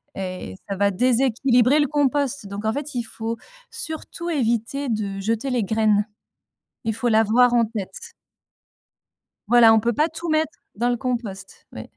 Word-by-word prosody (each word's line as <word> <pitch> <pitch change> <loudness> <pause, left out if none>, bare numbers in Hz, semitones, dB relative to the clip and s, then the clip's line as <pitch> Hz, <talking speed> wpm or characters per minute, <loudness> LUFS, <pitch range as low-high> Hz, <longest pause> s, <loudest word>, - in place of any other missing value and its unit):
et 185 - -5
ça 200 - -2
va 200 0 +2
déséquilibrer 250 +4 +3
le 290 - +3
compost, 285 -4 0
donc 200 +2 -6
en 220 - +1
fait, 290 -1 -5
il 240 - -1
faut 225 +1 -5 0.3
surtout 320 +2 -5
éviter 250 -1 -1
de 205 -3 -2
jeter 225 +6 -1
les 245 -3 +1
graines. 210 0 +2 0.8
Il 225 - 0
faut 240 +3 -1
l'avoir 225 +3 +4
en 235 -1 +4
tête. 210 -4 -7 1.4
Voilà, 235 -2 +7
on 220 - +5
peut 235 +2 0
pas 305 +7 +2
tout 335 +1 -6
mettre 315 +1 0 0.2
dans 240 +4 0
le 245 - 0
compost, 235 -6 -5
oui. - - -7
235 Hz, 160 wpm, -23 LUFS, 215-270 Hz, 1.4 s, Voilà